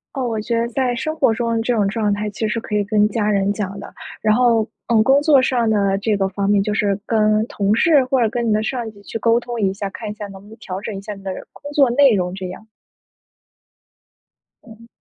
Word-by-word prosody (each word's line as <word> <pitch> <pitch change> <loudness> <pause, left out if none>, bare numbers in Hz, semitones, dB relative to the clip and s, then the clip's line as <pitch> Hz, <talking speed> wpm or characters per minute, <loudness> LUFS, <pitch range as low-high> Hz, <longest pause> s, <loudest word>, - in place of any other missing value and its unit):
哦， 270 - -2
我 225 -2 -2
觉 235 +2 -2
得 230 +1 0
在 250 0 -1
生 310 +6 -3
活 265 -7 +3
中 230 0 -1
这 240 +2 0
种 205 -3 +1
状 210 0 0
态 210 +1 -3
其 215 +2 -3
实 230 +2 -2
可 210 -1 -3
以 205 - +1
跟 210 0 +2
家 210 0 -1
人 200 -1 +1
讲 200 -1 -4
的。 - - -10 0.3
然 215 - +3
后， 240 -1 +3 0.3
呃， 230 -2 +3
工 270 +4 +4
作 290 -4 +5
上 245 -3 +1
呢 200 -2 +2
这 210 +1 0
个 195 -1 0
方 195 +1 -2
面 205 -1 +3
就 210 - -2
是 205 -2 +1
跟 215 -1 +2
同 200 +1 0
事 290 +2 +4
或 255 0 +1
者 225 - +3
跟 235 0 -2
你 - - +2
的 215 +1 +1
上 240 0 -3
级 200 -1 -18
去 225 - -6
沟 230 +1 +3
通 240 -1 -5
一 195 -2 +1
下， 195 0 -4
看 215 +2 -7
一 210 - -5
下 210 -1 -7
能 195 -1 -11
不 200 - -18
能 220 - -13
调 190 -4 -6
整 210 0 -5
一 - - -6
下 210 +1 -7
你 195 - -14
的 190 - -3 0.2
工 285 - -10
作 280 -4 +4
内 270 0 +5
容 180 -2 -1
这 190 -1 -5
样。 180 +4 -9 2.0
嗯。 230 0 -14
215 Hz, 270 characters per minute, -20 LUFS, 205-235 Hz, 2.0 s, 作